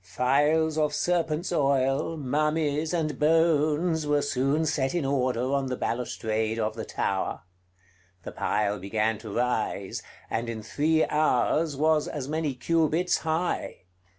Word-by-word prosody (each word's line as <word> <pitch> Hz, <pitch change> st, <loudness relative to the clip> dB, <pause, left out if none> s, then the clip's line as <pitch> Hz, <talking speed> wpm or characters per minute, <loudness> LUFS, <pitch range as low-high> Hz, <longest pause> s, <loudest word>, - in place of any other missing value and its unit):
Phials 145 Hz, -, +2 dB
of 150 Hz, -1 st, +1 dB
serpents' 170 Hz, +1 st, 0 dB
oil, 140 Hz, +1 st, +1 dB
mummies, 150 Hz, +2 st, 0 dB
and 160 Hz, -4 st, -1 dB
bones 160 Hz, 0 st, +2 dB
were 145 Hz, -1 st, +2 dB
soon 145 Hz, +3 st, +1 dB
set 145 Hz, -1 st, 0 dB
in 170 Hz, -5 st, 0 dB
order 130 Hz, -1 st, 0 dB
on 140 Hz, -1 st, 0 dB
the 125 Hz, -1 st, -3 dB
balustrade 110 Hz, -2 st, -2 dB
of 110 Hz, -1 st, -1 dB
the 110 Hz, -, -5 dB
tower. 95 Hz, -1 st, -2 dB, 0.8 s
The -, -, -6 dB
pile 105 Hz, -1 st, -1 dB
began 105 Hz, +3 st, -1 dB
to 110 Hz, -, -9 dB
rise; 110 Hz, -3 st, -1 dB, 0.3 s
and 115 Hz, +1 st, -2 dB
in 110 Hz, -2 st, -5 dB
three 155 Hz, +7 st, +1 dB
hours 150 Hz, +1 st, +1 dB
was 155 Hz, 0 st, +2 dB
as 140 Hz, -3 st, -5 dB
many 155 Hz, -2 st, -2 dB
cubits 165 Hz, +4 st, +1 dB
high. 165 Hz, -, -2 dB
145 Hz, 135 wpm, -27 LUFS, 125-155 Hz, 0.8 s, Phials